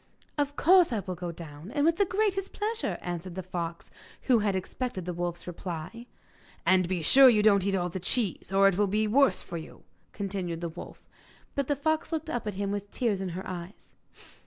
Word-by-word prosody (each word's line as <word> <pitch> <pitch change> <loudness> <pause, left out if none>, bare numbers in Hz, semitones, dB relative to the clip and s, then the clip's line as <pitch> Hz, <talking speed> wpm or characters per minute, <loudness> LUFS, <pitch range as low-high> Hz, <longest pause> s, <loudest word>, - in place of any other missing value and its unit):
'Of 290 -1 -1
course 360 0 +5
I 220 -3 0
will 185 - -5
go 175 0 -5
down, 160 +2 -10
with 335 0 +3
the 400 - +4
greatest 390 0 -1
pleasure,' 440 +2 -2
answered 175 0 -5
the 190 - -4
fox, 170 -2 -5 0.3
who 250 -4 +4
had 205 -2 +1
expected 190 0 -4
the 180 - -3
wolf's 175 0 -4
reply. 180 +6 -6 0.6
'And 185 -1 +4
be 180 -3 -1
sure 265 - +8
you 215 -3 +3
don't 200 -3 +4
eat 195 - +1
all 180 -1 0
the 185 - -5
cheese, 195 -1 -1
or 195 0 +5
it 195 -1 +1
will 205 - +3
be 210 +3 +1
the 210 - -2
worse 275 0 +4
for 170 - -6
you,' 160 - -10 0.3
continued 190 -4 -4
the 170 - -2
wolf. 165 - -11 0.5
But 280 -2 -1
the 290 - +1
fox 315 +3 -1
looked 320 -1 -3
up 240 -3 -3
at 210 - -3
him 200 0 -2
with 205 0 -4
tears 210 -5 -1
in 190 - -3
her 190 - -6
eyes. 180 +2 -8
195 Hz, 210 wpm, -28 LUFS, 175-255 Hz, 0.6 s, sure